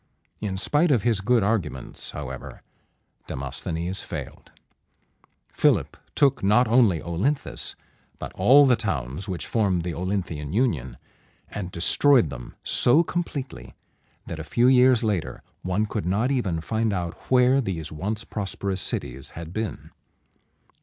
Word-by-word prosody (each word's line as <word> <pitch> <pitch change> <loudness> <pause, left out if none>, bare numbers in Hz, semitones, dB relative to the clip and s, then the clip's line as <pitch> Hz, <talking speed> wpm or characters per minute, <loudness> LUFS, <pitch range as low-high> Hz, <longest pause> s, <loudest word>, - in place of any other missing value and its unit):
In 100 -3 -3
spite 150 - +2
of 125 -8 +3
his 115 -4 +1
good 115 +2 +3
arguments, 100 - -3
however, - - -8 0.6
Demosthenes 80 +7 -4
failed. - - -8
[Illustration: - - -37 0.4
Demosthenes.] - - -18
Philip - - +3 0.2
took 135 -5 +3
not 105 +5 +4
only 110 -7 +4
O 85 -1 -5
lyn´thus, 140 - -2 0.4
but - - -7
all 145 +3 +6
the 130 -2 +5
towns 75 - -3
which 90 -2 -4
formed 95 -6 +1
the 85 -1 -3
Olynthian 85 -5 -3
union, 75 - 0 0.5
and 100 -3 -5
destroyed 105 - +5
them 60 -3 -9
so 135 +8 +4
completely 155 -6 -5 0.5
that 80 - -6
a - - -4
few 120 +10 +1
years 125 -2 +5
later 100 -7 -2 0.2
one 95 +4 0
could 105 -3 -4
not 110 +8 +1
even 95 -12 -1
find 110 +3 -1
out 85 -3 -2 0.2
where 130 +1 +4
these 85 - -4
once 105 +8 -3
prosperous 100 -2 -3
cities 65 +3 -4
had 85 0 -7
been. 110 0 -5
100 Hz, 140 wpm, -25 LUFS, 85-125 Hz, 0.6 s, all